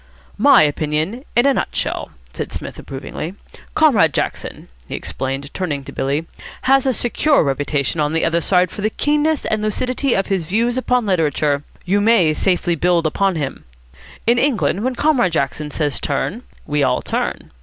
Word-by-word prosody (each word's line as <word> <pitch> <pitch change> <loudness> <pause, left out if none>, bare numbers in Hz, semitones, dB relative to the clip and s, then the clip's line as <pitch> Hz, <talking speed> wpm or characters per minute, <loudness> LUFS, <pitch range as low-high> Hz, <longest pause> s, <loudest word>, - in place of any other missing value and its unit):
"My - - +7
opinion 155 - -1
in 240 +3 +4
a 280 - +5
nutshell," - - -2 0.2
said - - -5
Psmith, - - -7
approvingly. 150 +6 -6 0.4
"Comrade 220 - +4
Jackson," - - -3 0.2
he - - -5
explained, 135 +2 -4
turning 150 -7 -3
to - - -9
Billy, 140 +4 -1 0.4
"has 270 0 +4
a - - +4
secure 275 - +2
reputation 145 +1 -1
on 150 +1 0
the 165 - +1
other 170 +1 +1
side 180 +1 +2
for - - -7
the 215 - +1
keenness 300 +4 +1
and 215 -1 0
lucidity 250 +5 0
of 195 - +1
his 190 -5 -1
views 230 +8 0
upon 250 -2 +1
literature. 150 -6 +1 0.2
You 200 +3 +2
may 205 -8 +4
safely 175 +1 +1
build 170 0 +2
upon 190 +4 +1
him. 140 -4 -4 0.6
In 240 +1 +4
England 225 -7 +1
when 255 0 -1
Comrade 255 - +2
Jackson 150 0 -1
says 150 -1 -2
'Turn' 170 - -2 0.2
we 150 0 0
all 130 -2 +1
turn. - - -3
180 Hz, 165 wpm, -19 LUFS, 150-240 Hz, 0.6 s, My